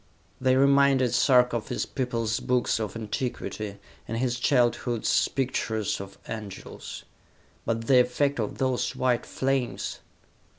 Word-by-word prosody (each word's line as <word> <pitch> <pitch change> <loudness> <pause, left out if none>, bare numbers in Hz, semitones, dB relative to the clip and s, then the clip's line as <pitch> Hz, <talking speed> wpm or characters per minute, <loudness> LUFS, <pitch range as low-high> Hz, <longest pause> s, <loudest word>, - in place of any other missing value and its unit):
They 130 0 +4
reminded 140 -2 +4
Sarka 125 0 +4
of 110 - -7
his - - -2
people's 115 -4 -2
books 125 -2 +1
of 110 -2 -4
antiquity, 110 -2 -4 0.3
and 115 - -3
his 125 0 -1
childhood's 120 -2 +2
pictures 115 -5 -1
of 100 0 -10
angels.... 105 -4 -7 0.6
But 115 0 -1
the 130 +1 +6
effect 130 +3 +1
of 105 - -2
those 130 -2 0
white 125 -2 +1
flames!... 135 -2 -1
125 Hz, 125 wpm, -27 LUFS, 115-130 Hz, 0.6 s, the